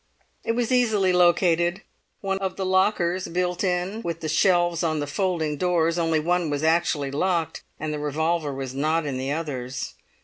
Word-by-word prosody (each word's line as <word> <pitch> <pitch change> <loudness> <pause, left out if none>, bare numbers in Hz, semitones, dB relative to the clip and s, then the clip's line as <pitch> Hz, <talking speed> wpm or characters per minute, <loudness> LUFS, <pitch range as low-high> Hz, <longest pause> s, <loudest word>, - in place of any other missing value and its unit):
It 230 - 0
was 240 +1 -1
easily 220 -7 +3
located; 175 +1 +3 0.4
of 195 -1 -2
the 190 - -3
lockers, 185 -1 +1
built 180 +1 -1
in 185 +4 -1
with 170 -5 -4
the 155 - -3
shelves 175 0 +3
on 160 -3 0
the 145 - -1
folding 160 -2 -1
doors, 170 0 +1
only 165 -1 +2
one 175 +1 0
was 145 0 -2
actually 160 -3 +1
locked, 165 +2 -1 0.2
and 155 0 -3
the 150 - -3
revolver 155 +1 -1
was 135 -1 -5
not 155 +4 0
in 135 -3 -3
the 135 +1 -2
others. 135 -5 -4
170 Hz, 170 wpm, -24 LUFS, 150-185 Hz, 0.4 s, easily